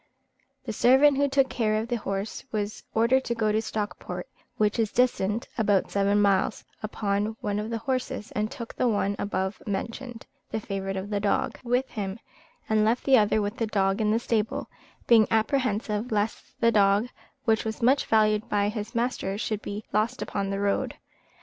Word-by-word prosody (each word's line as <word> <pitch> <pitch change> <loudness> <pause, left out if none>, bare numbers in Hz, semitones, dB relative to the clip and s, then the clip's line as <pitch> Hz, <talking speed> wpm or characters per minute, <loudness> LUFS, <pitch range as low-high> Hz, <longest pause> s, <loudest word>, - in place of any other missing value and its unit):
The - - -3
servant 265 +3 +5
who 285 0 +2
took 270 -1 +3
care 225 -4 0
of 220 +1 -1
the 240 0 -1
horses 200 0 -4
was 210 -1 -3
ordered 240 +4 +3
to 235 - -1
go 215 -2 +1
to 215 +1 +1
Stockport 215 -1 -4 0.3
(which 210 +1 +1
is 220 -2 +1
distant 235 -3 +1
about 205 -3 +2
seven 200 +1 +2
miles), 200 -2 +2 0.2
upon 210 0 -1
one 205 0 -1
of 215 +1 -4
the 230 - -2
horses, 250 -2 -3
and 210 0 -1
took 235 0 -7
the 250 - +1
one 205 -3 +1
above 190 0 -2
mentioned 230 +4 -4 0.2
(the 220 - -2
favourite 195 -2 -4
of 195 +2 -5
the 205 - +1
dog), 210 +6 0
with 250 +2 +1
him, 195 -2 -4 0.5
and 215 -1 +3
left 225 +3 +1
the 265 -3 +6
other 210 0 +2
with 205 +3 -3
the 225 - 0
dog 195 -1 +1
in 210 - +2
the 215 - +3
stable; 225 -2 -1 0.3
being 225 -3 +6
apprehensive 220 -1 0
lest 210 +1 -2
the 230 0 +4
dog, 205 +1 +4 0.4
which 220 -2 +2
was 220 +1 -4
much 265 +4 +3
valued 215 +1 +3
by 205 0 +2
his 215 +2 -5
master, 235 -5 -1
should 215 -1 -2
be 205 +1 -5
lost 225 +5 +1
upon 200 -1 -3
the 195 0 -2
road. 200 0 0
215 Hz, 185 wpm, -27 LUFS, 205-235 Hz, 0.5 s, the